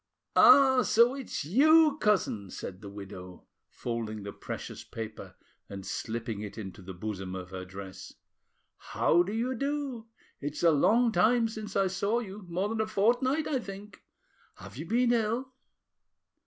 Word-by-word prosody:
"Ah! 265 -2 +7
so 235 +1 +4
it's 265 - -5
you, 305 - +5
cousin?" 185 - +1
said 90 +1 -7
the 100 - -8
widow, 95 -3 -10 0.2
folding 115 -3 -4
the 100 - -6
precious - - -7
paper 110 -1 -8 0.3
and 95 -1 -7
slipping 115 +1 -4
it 105 0 -7
into 100 -2 -8
the 95 0 -9
bosom 95 -1 -5
of 90 0 -7
her 95 -1 -6
dress. 95 0 -9 0.7
"How 170 - +2
do 180 +3 -2
you 235 +4 -1
do? 275 -3 -3 0.3
It's 145 +3 -5
a 170 - +6
long 230 +11 +4
time 230 +1 +3
since 215 -2 -7
I 195 - +3
saw 200 +4 0
you, 205 -4 -6
more 180 +4 -1
than 220 0 -1
a 215 - -1
fortnight, 245 +8 +2
I 270 - 0
think. 200 -2 -10 0.5
Have - - -12
you 155 +6 -7
been 240 +4 +3
ill?" 235 +3 -1
195 Hz, 155 wpm, -29 LUFS, -, 0.7 s, Ah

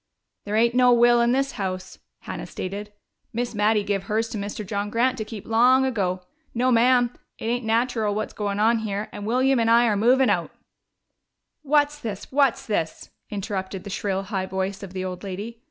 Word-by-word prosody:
"There 205 +1 -2
ain't 235 +2 +3
no 250 0 +5
will 240 0 +5
in 235 0 +3
this 275 +2 +1
house," 185 -3 -5 0.2
Hannah - - -6
stated. 205 +3 -6 0.4
"Miss 240 +1 -2
Mattie 210 0 +2
give 200 -1 -2
hers 225 +2 -1
to 220 - -5
Mr. 205 +1 -5
John 205 +1 -3
Grant 245 +4 +1
to - - -1
keep, 215 -2 -9
long 250 +4 +4
ago. 190 -7 -1 0.3
No, 250 +2 +2
ma'am, 245 0 +4 0.2
it - - -8
ain't 240 +1 -1
nateral 225 -2 +1
what's 215 0 -3
goin' 205 -1 -2
on 225 +2 +3
here, 210 -1 -3
and 205 0 -7
William 260 +2 +2
and 230 0 +2
I 235 +1 +6
are 215 -3 +2
movin' 250 +5 +4
out - - 0 0.6
" - - -56
"What's 295 0 +3
this? 210 -6 -6
What's 275 -2 +2
this?" 165 -7 -3 0.2
interrupted 195 -2 -4
the 200 - -7
shrill, 195 0 -2
high 190 -1 -3
voice 190 +1 -3
of 195 -2 -9
the 185 0 -3
old 185 0 -6
lady. 205 +4 -6
220 Hz, 195 wpm, -24 LUFS, 200-240 Hz, 0.6 s, I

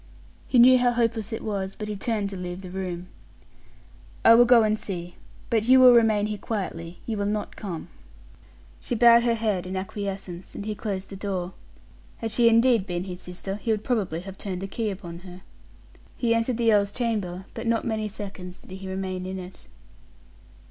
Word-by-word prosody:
He 255 - +2
knew 255 +1 +8
how 245 0 +3
hopeless 230 -3 0
it 225 - -4
was, 195 -3 -3
but 210 - -6
he 210 - -3
turned 205 -1 -2
to - - -6
leave 180 0 -6
the 180 - -8
room. 180 -2 -4 1.2
"I 230 - +9
will 240 +1 +7
go 240 -2 +6
and 215 0 +1
see. 175 -4 -6 0.4
But 220 -2 +2
you 260 +2 +7
will 255 -1 +9
remain 220 -3 +4
here 210 -1 -4
quietly 175 -5 -4
you 225 -2 -3
will 200 0 -1
not 210 0 -3
come." 180 -7 -6 0.9
She - - -3
bowed 235 0 +7
her 235 -1 +2
head 210 -5 -1
in 190 +1 -4
acquiescence, 190 -2 -6
and 200 - -6
he 215 - -2
closed 195 -2 -4
the - - -6
door. 190 -2 -3 0.6
Had 225 -1 -4
she 235 0 +5
indeed 230 -3 +4
been 175 -1 -2
his 180 -1 -7
sister, 190 +2 -6
he 225 - -6
would 215 -1 +1
probably 195 -9 -1
have 190 +1 -10
turned 185 -3 -4
the - - -3
key 220 +2 -2
upon 175 -4 -7
her. 180 0 -12 0.7
He 235 -2 +2
entered 230 +1 0
the 230 -2 +3
earl's 200 -1 +3
chamber, 205 -6 -2
but 230 +1 -5
not 230 0 +1
many 220 -2 -1
seconds 195 -3 -8
did 190 - -10
he 190 0 -7
remain 185 -1 -4
in 190 0 -4
it. 185 0 -10
205 Hz, 195 wpm, -25 LUFS, 185-230 Hz, 1.2 s, I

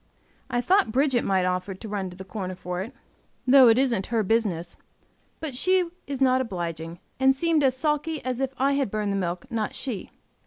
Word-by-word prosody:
I 240 - 0
thought 360 - +3
Bridget 260 0 +2
might 190 -2 +1
offer 185 +1 -2
to 220 - -9
run 200 -3 -3
to 180 - -12
the 190 - -7
corner 185 -2 -5
for 180 0 -4
it, 220 +7 -6 0.5
though 260 0 +8
it 225 0 +6
isn't 240 -7 +1
her 230 -2 +1
business, 185 -6 0 0.6
but 315 -4 -4
she 360 +6 +2 0.2
is 275 -2 -4
not 260 -1 +4
obliging, 170 -6 -4 0.2
and 265 0 +4
seemed 325 0 +2
as 260 -1 +2
sulky 300 +2 -1
as 255 -1 -2
if 270 -1 -1
I 275 +2 +2
had 275 -5 0
burned 210 0 -1
the - - -1
milk, 175 -2 -2
not 220 -2 -2
she. 240 -8 -4
230 Hz, 200 wpm, -25 LUFS, 190-270 Hz, 0.6 s, though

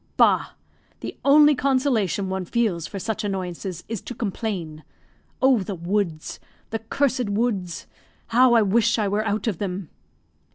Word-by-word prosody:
"Bah! - - +3 0.5
The - - -6
only 295 +1 +7
consolation 255 - +1
one 190 0 -2
feels 180 -6 0
for 200 - -7
such 220 +2 -3
annoyances 185 -2 -4
is 225 -4 -4
to 245 - -8
complain. 190 -8 -4 0.6
Oh, 260 -3 +5
the 195 0 -4
woods! 170 -2 -2 0.3
the 225 - -1
cursed 250 0 0
woods! 200 -6 -1 0.4
how 245 +1 +5
I 225 - +6
wish 230 +4 +2
I 210 -2 +1
were 205 +2 0
out 210 -1 -1
of 210 -8 -1
them." 190 -3 -4
210 Hz, 150 wpm, -24 LUFS, 185-235 Hz, 0.6 s, only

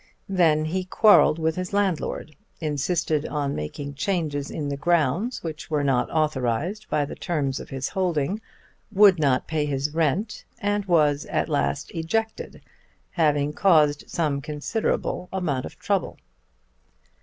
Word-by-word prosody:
Then 160 -5 +3
he 185 +4 -1
quarrelled 205 -4 +5
with 160 0 0
his 185 +1 -4
landlord, 185 -6 -1 0.2
insisted 155 0 0
on 145 -2 -2
making 140 - -5
changes 145 -2 -2
in 145 -2 -4
the 140 - -2
grounds 170 - 0
which 160 -2 -6
were 150 -2 0
not 130 -3 +1
authorised 155 - -1
by 145 - +1
the - - -7
terms 145 -6 -2
of - - -9
his 135 -1 -3
holding, 180 +1 -1 0.5
would 200 -3 +6
not 135 -4 +2
pay 155 -2 -1
his 140 +1 -2
rent, 165 - 0
and 205 -2 -1
was 150 -5 +2
at - - -1
last 145 -1 -1
ejected, 220 +7 -3 0.5
having 150 -3 +1
caused 150 -6 +3
some 150 -4 -1
considerable 155 +5 -2
amount 160 -9 -1
of - - -14
trouble. - - -1
155 Hz, 140 wpm, -24 LUFS, 145-180 Hz, 0.5 s, would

